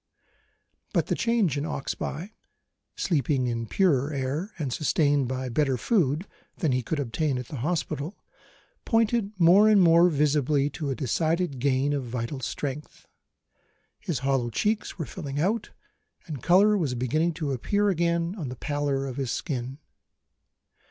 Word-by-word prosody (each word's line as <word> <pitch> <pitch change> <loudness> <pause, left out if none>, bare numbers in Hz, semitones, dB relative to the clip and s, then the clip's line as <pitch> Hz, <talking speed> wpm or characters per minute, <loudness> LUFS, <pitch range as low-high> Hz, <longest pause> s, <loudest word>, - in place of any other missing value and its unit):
But - - +2
the - - -1
change 220 - +1
in - - -3
Oxbye 155 +5 -4 0.6
sleeping 145 -6 0
in 115 -1 -2
purer 150 - +2
air 145 +8 -2
and 140 -7 -2
sustained 145 -2 +2
by 130 +1 -3
better 135 +1 +1
food 160 - +1 0.3
than 160 -6 0
he 130 0 +1
could 145 +6 -3
obtain 140 +2 -1
at 125 -2 -6
the 145 - -6
hospital 155 - -2 0.7
pointed 225 -2 +1
more 185 +6 +7
and 210 -2 +6
more 170 0 +6
visibly 145 -1 +1
to 145 -1 -4
a 135 - -1
decided 160 +2 0
gain 135 +2 +1
of 140 -2 -1
vital 120 +2 -4
strength. 145 +3 -5 0.9
His 165 - -3
hollow 135 -3 +1
checks 210 - -1
were 165 - -3
filling 145 -1 -5
out, 205 +8 0 0.6
and 150 -7 -6
colour 200 - +5
was 150 -10 0
beginning 155 +8 0
to 150 -4 -2
appear 205 - +1
again 170 -1 0
on 145 -7 -4
the 125 - -6
pallor 145 -1 -1
of 130 -1 -6
his 135 -3 -2
skin. 130 -3 -3
145 Hz, 150 wpm, -26 LUFS, 130-170 Hz, 0.9 s, more